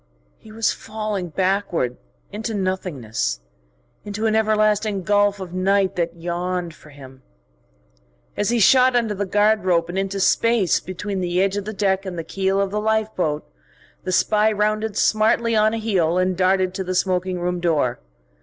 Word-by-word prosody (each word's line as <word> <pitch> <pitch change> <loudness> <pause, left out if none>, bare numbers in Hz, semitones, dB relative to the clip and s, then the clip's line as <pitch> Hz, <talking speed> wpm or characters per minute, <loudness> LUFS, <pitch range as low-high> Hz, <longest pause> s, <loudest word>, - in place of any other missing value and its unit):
He 220 - -15
was 225 0 0
falling 210 -4 -4
backward 185 -8 -1 0.4
into 220 +2 -4
nothingness, 150 - -2 0.6
into 210 +2 -4
an 220 - +2
everlasting 215 -2 +1
gulf 205 +1 +2
of 180 -2 -7
night 190 +1 +1
that 170 -1 -2
yawned 175 0 -3
for 155 - -17
him.... 135 -2 -14 1.1
As 205 - 0
he 240 - +1
shot 255 +5 +5
under 230 -3 +1
the 200 0 -3
guard 210 +2 +2
rope 170 -2 +1
and 185 +2 -2
into 195 0 -2
space 225 0 +2
between 190 +2 -5
the 175 0 -1
edge 195 +1 +1
of 205 -1 -3
the 215 - -4
deck 195 -2 0
and 185 -3 -6
the 165 - -3
keel 195 +3 -1
of 200 -1 0
the 210 +1 -1
lifeboat, 215 -8 -1 0.6
the 185 - -3
spy 215 +3 +3
rounded 215 0 -1
smartly 225 +1 +2
on 215 0 +4
a 225 - -2
heel 185 -7 +1
and 185 0 +1
darted 185 0 +2
to 190 - -3
the 185 0 -3
smoking 185 0 0
room 180 0 -2
door. 155 -8 0
195 Hz, 170 wpm, -21 LUFS, 180-215 Hz, 1.1 s, shot